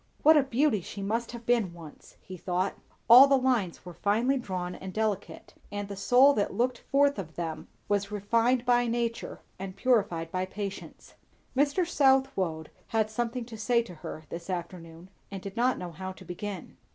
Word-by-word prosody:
What 315 +2 +8
a 295 - +6
beauty 265 -4 +1
she 200 +3 -7
must 230 +4 -2
have 235 -1 -9
been 225 -8 +1
once, 160 -3 -13
he 185 - -9
thought; 180 +2 -1 0.3
all 250 +4 +10
the 275 0 +4
lines 245 -11 0
were 180 - -8
finely 225 +9 +1
drawn 185 -8 -4
and 190 +1 -8
delicate; 215 -1 -3 0.2
and 205 0 -4
the 200 - -6
soul 250 +8 +5
that 205 - -1
looked 245 0 0
forth 280 -3 +2
of 160 -5 -7
them 165 -2 -5 0.2
was 200 -1 0
refined 230 +4 +1
by 245 0 +3
nature 235 0 -3 0.2
and 190 0 -6
purified 195 -10 +1
by 185 0 -1
patience. 200 0 -7 0.4
Mr. 290 +6 +2
Southwode 265 - +1 0.2
had 220 -1 0
something 240 +2 -2
to 225 -2 -10
say 235 +2 +2
to 220 - -11
her 155 -1 -8
this 170 +2 -7
afternoon, 175 0 -6 0.2
and 195 -2 -7
did 195 -1 -7
not 250 +2 +2
know 180 -1 -6
how 185 +3 -6
to - - -14
begin. 185 0 -7
210 Hz, 180 wpm, -28 LUFS, 185-245 Hz, 0.4 s, all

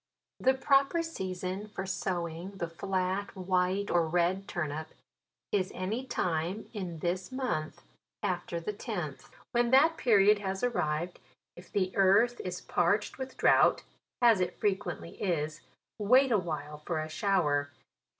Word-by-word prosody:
The 260 +1 +3
proper 275 +4 +3
season 190 - -4
for 195 -2 -5
sowing 180 0 -3
the 170 - -2
flat 190 +3 -2
white 185 +1 0
or 170 -2 +3
red 180 +4 +1
turnip, 155 -2 -3 0.6
is 190 -2 0
any 220 +8 -3
time 180 -2 -1
in 185 -6 -5
this 180 +5 -2
month 230 -13 -3 0.4
after 175 -1 -2
the 190 +6 -4
tenth. - - -5 0.3
Vvhen 240 0 +3
that 310 +6 +5
period 210 -5 +5
lias 195 0 -3
arrived. 175 -8 -1 0.4
if 175 - -14
the 190 -2 0
earth 200 +6 +4
is 180 -1 -4
parched 200 +8 0
with 260 0 -6
drought, - - +4 0.4
as 230 -4 +6
it 180 0 -2
fre 210 - +4
quently 190 -4 -6
is, 155 -5 -1 0.4
wait 255 +6 +5
a 215 - +4
while 150 -4 -5
for 155 +1 -3
a 155 - -3
shower. 155 -5 +1
185 Hz, 140 wpm, -30 LUFS, 170-210 Hz, 0.6 s, as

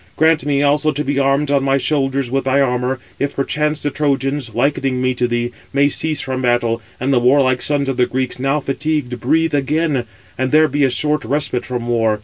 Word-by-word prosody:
Grant 160 -1 +3
me 140 -1 +2
also 150 +2 +2
to 150 +1 -3
be 140 -1 -1
armed 140 +1 +1
on 140 -1 +2
my 135 0 +2
shoulders 135 -2 0
with 135 0 -1
thy 135 +1 +2
armour, 125 -1 0 0.2
if 140 0 -2
perchance 150 +2 -1
the 145 - -1
Trojans, 135 -4 -1
likening 135 0 0
me 130 0 +1
to 125 0 0
thee, 120 0 -2 0.2
may 140 +1 +3
cease 155 +1 -1
from 130 -1 -3
battle, 120 -2 +1 0.2
and 135 +2 0
the 125 - +4
warlike 130 0 +3
sons 145 -2 0
of 135 -2 -2
the 125 -1 +3
Greeks, 130 0 -2
now 135 +3 +1
fatigued, 140 -3 -2
breathe 160 +6 +1
again; 145 -2 0 0.3
and 130 0 0
there 155 +1 +5
be 145 0 0
a 135 - +4
short 150 +4 0
respite 125 -1 -1
from 120 -1 -4
war. 115 -3 +1
135 Hz, 210 wpm, -18 LUFS, 125-145 Hz, 0.3 s, there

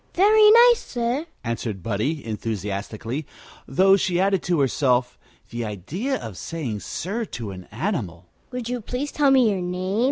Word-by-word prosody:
"Very 425 +3 +6
nice, 475 +1 +7
sir," 245 +6 -2 0.2
answered 115 -5 -4
Buddie, 115 - -2
enthusiastically; 110 - -4 0.4
though 190 +8 +5
she 180 -2 0
added 195 -1 +2
to 175 -3 0
herself: 125 -2 +1 0.3
The 120 0 -3
idea 145 - -3
of 105 - -8
saying 135 -11 -4
sir 205 - -4
to 115 - -6
an 90 -1 -9
animal! 105 - -3 0.2
"Would 250 -2 -5
you 245 0 -3
please 255 +6 -4
tell 290 -2 +3
me 255 -5 +5
your 190 -2 -2
name?" 185 +3 -2
170 Hz, 155 wpm, -23 LUFS, -, 0.4 s, nice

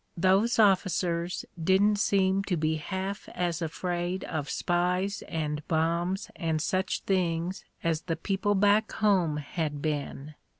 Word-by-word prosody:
Those 195 +6 +3
of 200 -4 +5
ficers 175 -1 -2 0.2
didn't 200 +4 +4
seem 195 -1 +2
to 180 -3 0
be 155 0 0
half 190 +5 -4
as 175 -2 -1
afraid 175 +2 -2
of 150 -3 -4
spies 180 +3 0
and 150 -2 -2
bombs 170 +4 0
and 160 -2 -1
such 185 +4 -1
things 180 -1 -1 0.2
as 165 -2 0
the 165 -1 -2
people 195 +4 0
back 205 +2 +3
home 185 -8 +2
had 150 0 -3
been. 145 -1 -3
180 Hz, 135 wpm, -28 LUFS, 160-195 Hz, 0.2 s, of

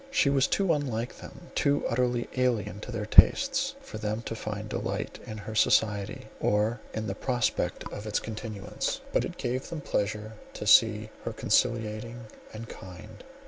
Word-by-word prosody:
She 150 - +3
was 135 -1 +3
too 195 -4 +2
unlike 125 -6 -2
them, - - -12
too 140 0 +2
utterly 120 0 0
alien 120 -6 0
to 125 - -7
their 110 -3 -3
tastes, 270 - +5
for 270 - -8
them 110 +1 -2
to 115 - -4
find 110 -1 -5
delight - - -3
in 110 - -6
her 110 +1 -7
society, 105 -2 +2
or 105 +2 +1
in 110 0 -3
the 100 - -2
prospect 120 +2 -1
of 105 +1 -6
its 105 - 0
continuance, 110 -2 -4
but - - +3
it - - -7
gave 130 +2 -2
them 165 -3 -5
pleasure 105 -2 -2 0.2
to - - -5
see - - +5
her - - -3
conciliating 115 0 0 0.3
and 115 +1 -8
kind. 95 +3 -11
110 Hz, 165 wpm, -28 LUFS, 105-125 Hz, 0.3 s, tastes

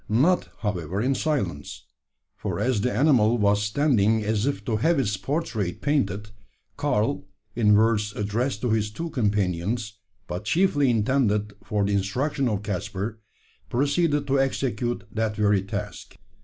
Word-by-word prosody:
Not, 145 +12 +2
however, 95 -4 -2
in 130 +5 +1
silence: 110 - -2 0.5
for - - -4
as 125 -5 +1
the 125 - 0
animal 120 -2 +4
was 100 -1 +3
standing 110 -2 +2
as 110 +3 0
if 105 -8 -2
to 110 - 0
have 165 +9 +2
its 105 -6 0
portrait 110 - -2
painted, 105 -8 -1 0.4
Karl, 140 -6 0 0.3
in 105 -3 +4
words 105 -1 +2
addressed 105 +3 -1
to 125 - 0
his 110 -1 +1
two 165 +10 -5
companions, 105 -1 -1 0.3
but 90 +4 -5
chiefly 150 - +2
intended 105 -3 +1
for 105 -2 0
the 100 - 0
instruction 125 +8 0
of 105 -2 -2
Caspar, 100 +2 -4 0.5
proceeded 145 +3 +1
to 135 0 +1
execute 120 -3 -1
that 110 -1 -1
very 105 -2 +3
task. 105 +1 -6
110 Hz, 140 wpm, -25 LUFS, 105-135 Hz, 0.5 s, animal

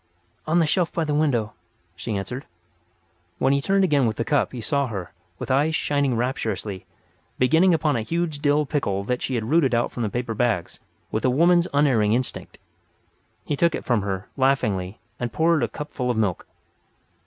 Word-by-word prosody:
"On 160 +2 +2
the 170 - +4
shelf 170 +2 +1
by 165 - -1
the 150 -1 -1
window," 125 -9 +1 0.4
she 105 +3 -3
answered. 125 +8 -5 0.9
When 135 - +2
he 140 - +1
turned 195 +6 +2
again 145 -8 +3
with 110 - -1
the 115 - -2
cup 145 -2 +1
he 125 - -6
saw 140 +5 0
her, 95 -7 -6 0.2
with - - -4
eyes 150 +4 +2
shining 140 -5 +1
rapturously, 110 -5 -3 0.5
beginning 160 +8 +4
upon 155 -3 +2
a 115 - 0
huge 165 +4 -2
Dill 145 +1 +2
pickle 100 -10 -1
that 125 +4 -2
she 130 - -2
had 115 +2 -2
rooted 150 -7 +3
out 120 - 0
from 120 - -5
the 110 - 0
paper 120 +1 -3
bags 110 -6 -1 0.3
with 110 - -2
a 130 - +3
woman's 170 +6 +4
unerring 130 -8 +3
instinct. 125 +2 -3 0.9
He 145 - -1
took 170 +2 +2
it - - -6
from 120 -4 +2
her, 95 -1 -4
laughingly, 110 -8 +1 0.2
and 120 -1 -3
poured 165 +1 +2
the 120 - +1
cup 150 +6 -8
full 125 -1 -2
of 120 - 0
milk. 100 -6 -1
130 Hz, 190 wpm, -24 LUFS, 110-150 Hz, 0.9 s, the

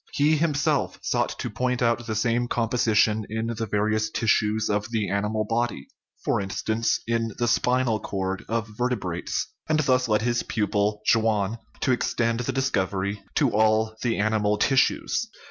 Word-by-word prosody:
He 150 +2 +3
himself 150 -2 0
sought - - 0
to - - -3
point 125 -1 -1
out 115 0 +1
the 110 - -2
same 115 +2 +1
composition 110 -2 +2
in 110 +2 -2 0.2
various 110 +1 +1
tissues 110 -1 +1
of 105 +2 -1
the 110 -3 -1
animal 105 +2 0
body 115 - -2 0.4
for - - +1
instance, 110 +3 -1
in 115 -1 -1
the 120 - 0
spinal 125 -2 +2
cord 95 -1 -3
of 115 -1 -1
vertebrates 105 -8 -2 0.2
and 155 0 +3
thus 130 -3 +2
led 105 -1 +2
his 120 0 +1
pupil, 105 0 -1
Schwann, 110 -1 +2 0.2
to - - +2
extend 120 -1 0
the 125 +2 -1
discovery 100 -6 -1
to - - +3
all 110 0 +2
the 120 -2 0
animal 105 0 +1
tis 135 +3 +4
sues. 235 - -1
110 Hz, 155 wpm, -25 LUFS, 105-120 Hz, 0.4 s, tis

